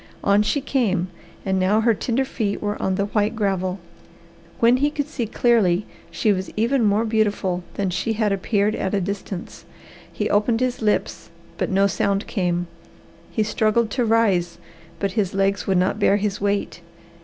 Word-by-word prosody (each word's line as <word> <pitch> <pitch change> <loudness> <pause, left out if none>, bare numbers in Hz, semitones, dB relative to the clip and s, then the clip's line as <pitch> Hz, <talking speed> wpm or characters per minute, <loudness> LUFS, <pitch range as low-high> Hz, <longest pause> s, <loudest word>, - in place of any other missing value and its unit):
On 200 +1 +4
she 245 +7 0
came, 200 -10 0 0.4
and 190 -1 +1
now 200 +4 +3
her 230 0 +4
tender 245 +5 -1
feet 215 -6 -2
were 205 0 -2
on 190 - 0
the 200 - 0
white 210 +2 0
gravel. 190 -3 -1 0.8
When 235 +2 +5
he 290 +3 +2
could 295 -1 -3
see 250 -7 -3
clearly 210 -5 +2 0.2
she 215 - +1
was 190 0 -4
even 235 +3 +2
more 210 +2 +2
beautiful 205 -5 0
than 195 -2 -1
she 190 +5 -1
had 215 -1 0
appeared 200 +2 +1
at 190 +1 -2
a - - +2
distance. 195 -1 -5 0.5
He - - -2
opened 220 +3 +2
his 255 -1 -1
lips, 210 -1 -1 0.3
but - - 0
no 195 +1 +3
sound 200 0 0
came. 175 -4 -1 0.6
He 220 - 0
struggled 215 +1 +1
to 250 - 0
rise, 205 -7 +2 0.4
but 200 -1 -1
his 195 -3 -1
legs 195 0 0
would 190 -2 +2
not 185 +3 +1
bear 205 -1 +4
his 205 -1 -2
weight. 200 -3 -1
205 Hz, 175 wpm, -22 LUFS, 195-225 Hz, 0.8 s, When